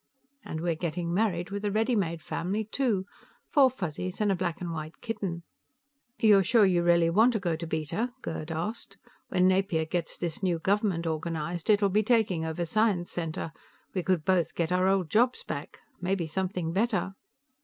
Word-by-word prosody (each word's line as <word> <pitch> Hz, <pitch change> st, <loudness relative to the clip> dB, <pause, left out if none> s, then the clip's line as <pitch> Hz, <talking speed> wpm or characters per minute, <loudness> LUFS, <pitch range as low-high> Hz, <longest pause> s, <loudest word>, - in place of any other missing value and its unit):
And 160 Hz, -, -5 dB
we're 170 Hz, 0 st, +1 dB
getting 170 Hz, +1 st, -3 dB
married 180 Hz, -3 st, 0 dB
with 200 Hz, +1 st, -4 dB
a 205 Hz, -, +1 dB
ready 225 Hz, +4 st, +1 dB
made 170 Hz, -6 st, -1 dB
family, 195 Hz, +6 st, -2 dB
too. 220 Hz, -3 st, 0 dB, 0.5 s
Four 275 Hz, -3 st, +6 dB
Fuzzies 185 Hz, -, -4 dB
and 210 Hz, -2 st, +2 dB
a -, -, +2 dB
black 175 Hz, -2 st, -2 dB
and 175 Hz, -2 st, -4 dB
white 155 Hz, 0 st, -6 dB
kitten. 190 Hz, -7 st, -4 dB, 0.7 s
"You're 205 Hz, -3 st, +6 dB
sure 215 Hz, +3 st, +5 dB
you 180 Hz, -2 st, +3 dB
really 170 Hz, -1 st, +4 dB
want 225 Hz, +7 st, +5 dB
to 220 Hz, -, 0 dB
go 175 Hz, -4 st, -1 dB
to 165 Hz, +1 st, -6 dB
Beta?" 160 Hz, +10 st, -2 dB
Gerd 160 Hz, 0 st, -4 dB
asked. 170 Hz, +8 st, -4 dB, 0.3 s
"When 180 Hz, 0 st, +3 dB
Napier 185 Hz, -4 st, +2 dB
gets 165 Hz, +1 st, -3 dB
this 170 Hz, -1 st, -3 dB
new 180 Hz, -3 st, +1 dB
government 190 Hz, -1 st, 0 dB
organized, 165 Hz, +2 st, -3 dB
it'll 205 Hz, -1 st, +4 dB
be 210 Hz, +3 st, +3 dB
taking 215 Hz, -7 st, +2 dB
over 160 Hz, +2 st, -2 dB
Science 195 Hz, -1 st, +1 dB
Center. 165 Hz, -1 st, -3 dB, 0.4 s
We 185 Hz, -, 0 dB
could 175 Hz, -4 st, 0 dB
both 175 Hz, -4 st, +2 dB
get 170 Hz, 0 st, -1 dB
our 185 Hz, +1 st, +3 dB
old 190 Hz, -5 st, +1 dB
jobs 245 Hz, +3 st, +3 dB
back. 140 Hz, -, -6 dB, 0.2 s
Maybe 180 Hz, -1 st, 0 dB
something 180 Hz, 0 st, -2 dB
better." 200 Hz, -1 st, 0 dB
180 Hz, 180 wpm, -28 LUFS, 165-205 Hz, 0.7 s, Four